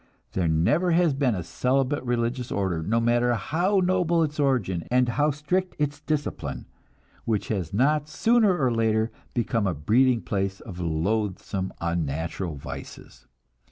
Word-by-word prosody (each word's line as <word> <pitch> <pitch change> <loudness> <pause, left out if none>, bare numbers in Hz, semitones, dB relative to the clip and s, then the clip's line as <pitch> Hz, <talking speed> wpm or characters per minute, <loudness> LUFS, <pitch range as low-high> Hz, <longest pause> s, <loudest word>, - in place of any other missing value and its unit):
There 90 -3 0
never 145 - +2
has 170 -3 +3
been 135 -4 +1
a 90 - -3
celibate 130 - 0
religious 120 0 -1
order, 95 -5 -1
no 110 +8 +1
matter 120 +1 +2
how 175 - +1
noble 175 -2 +2
its 150 -1 -3
origin 115 - +1
and 125 0 +3
how 145 +5 +2
strict 155 +6 -1
its 145 -1 -1
discipline, 150 -1 -3 0.6
which 110 -3 -1
has 95 -7 -2
not 150 +7 +2
sooner 215 +3 +3
or 130 -5 +1
later 110 0 +1 0.2
become 115 -3 0
a 90 - -1
breeding 115 - +3
place 95 -1 -2
of 90 -2 -9
loathsome 95 +3 -1
unnatural 85 +1 -2
vices. 70 - -10
120 Hz, 145 wpm, -25 LUFS, 95-145 Hz, 0.6 s, has